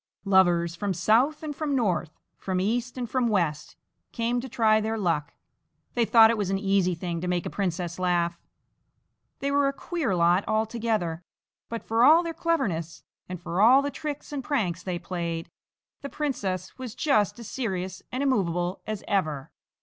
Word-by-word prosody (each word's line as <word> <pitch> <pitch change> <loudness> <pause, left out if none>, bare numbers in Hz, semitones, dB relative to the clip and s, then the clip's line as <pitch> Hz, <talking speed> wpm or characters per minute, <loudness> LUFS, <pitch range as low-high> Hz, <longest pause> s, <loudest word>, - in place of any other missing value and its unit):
Lovers 175 -3 +3
from 195 +1 -2
south 235 - +2
and 300 -2 -4
from 290 -1 -1
north, 180 - -1 0.2
from 185 -1 -2
east 240 +6 -1
and 245 -1 -3
from 250 +1 0
west, 170 -9 -1 0.4
came 240 +1 -1
to 265 - -7
try 220 -3 +3
their 220 +1 -2
luck 165 -6 -1 0.6
they 240 -1 +2
thought 225 0 +7
it 230 - -2
was 200 -3 -1
an 195 - +1
easy 195 -2 +1
thing 170 0 -4
to 180 - -3
make 180 -1 -1
a - - -4
princess 180 -3 -3
laugh. 175 -1 0 1.0
They 280 0 0
were 285 0 +3
a 275 - 0
queer 275 - -2
lot 175 +3 +3
altogether, 215 -6 -1 0.5
but 230 -1 -5
for 225 +1 +2
all 320 +6 +7
their 335 -1 -4
cleverness 180 - -1 0.3
and 180 -1 -5
for 175 +2 -2
all 255 +6 +7
the 285 - -2
tricks 295 0 -6
and 275 -2 -3
pranks 220 - -1
they 180 -2 -3
played, 170 -2 -4 0.5
the 280 - -6
princess 200 -11 -3
was 250 -4 -6
just 245 - +2
as 235 -3 -9
serious 190 -7 -3
and 255 +2 -2
immovable 180 -9 0
as 215 -2 -4
ever. 155 -8 -1
205 Hz, 175 wpm, -26 LUFS, 175-245 Hz, 1.0 s, thought